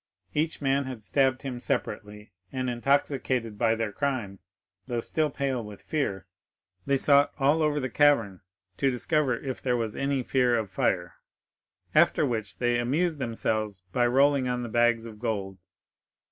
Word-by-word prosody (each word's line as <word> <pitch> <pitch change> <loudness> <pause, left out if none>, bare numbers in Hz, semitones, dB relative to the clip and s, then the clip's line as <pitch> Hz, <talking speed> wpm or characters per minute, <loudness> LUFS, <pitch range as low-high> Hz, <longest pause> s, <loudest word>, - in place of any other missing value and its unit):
Each 155 0 -1
man 135 0 +2
had 125 -4 -7
stabbed 130 +4 +1
him 130 -3 -4
separately, 105 -2 -4 0.2
and, 130 -1 -2
intoxicated 125 -3 0
by 115 -1 +3
their 110 -2 -2
crime, 110 -5 -2 0.5
though 120 -2 -1
still 155 +6 0
pale 135 -3 -2
with 105 -1 -10
fear, 100 - -2 0.6
they 140 - +3
sought 140 +1 +4
all 145 +3 +3
over 150 -1 +1
the 130 - -2
cavern 115 -9 +3 0.4
to 135 - +2
discover 130 0 +1
if 130 0 -5
there 125 -2 +1
was 115 -2 -3
any 135 -1 -1
fear 125 -2 +2
of 110 -3 -3
fire, 85 -2 -1 0.8
after - - +4
which 110 -4 -3
they 120 -1 +1
amused 150 +6 0
themselves 110 -5 -2
by 120 +3 +2
rolling 135 +1 +3
on 125 0 -1
the 120 - -5
bags 120 0 +2
of 110 -2 -10
gold. 100 -5 -3
125 Hz, 160 wpm, -27 LUFS, 110-140 Hz, 0.8 s, sought